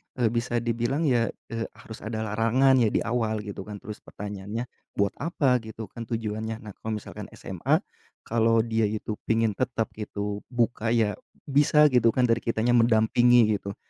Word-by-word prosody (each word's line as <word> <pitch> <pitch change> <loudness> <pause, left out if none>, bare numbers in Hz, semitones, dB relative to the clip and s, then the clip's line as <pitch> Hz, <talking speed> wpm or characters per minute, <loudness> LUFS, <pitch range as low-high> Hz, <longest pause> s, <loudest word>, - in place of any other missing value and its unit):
eee, 120 -4 +1
bisa 120 0 -1
dibilang 120 +6 0
ya, 120 -6 +3 0.2
eee, 115 0 -2
harus 110 - -11
ada 110 0 -4
larangan 115 +5 +3
ya 115 - +4
di - - 0
awal 110 -2 -1
gitu 100 -2 -7
kan. 105 - -6
Terus 105 -1 -7
pertanyaannya, 105 +3 -6 0.3
buat 100 -1 +2
apa 135 -7 +2
gitu 110 -2 -9
kan 115 -1 -7
tujuannya. 110 0 -3
Nah 105 - -8
kalau 110 -1 -3
misalkan 105 - -7
SMA, - - 0 0.4
kalau 115 0 +2
dia 110 -2 +1
itu 105 0 -4
pingin 115 -1 +2
tetap 115 +1 -2
gitu 105 -1 -4
buka 120 -2 0
ya 105 -3 +1 0.2
bisa 150 +1 +4
gitu 125 -2 +4
kan 130 - +3
dari 115 -1 +3
kitanya 115 +1 0
mendampingi 115 0 +5
gitu. 100 0 -6
115 Hz, 170 wpm, -26 LUFS, 110-120 Hz, 0.4 s, mendampingi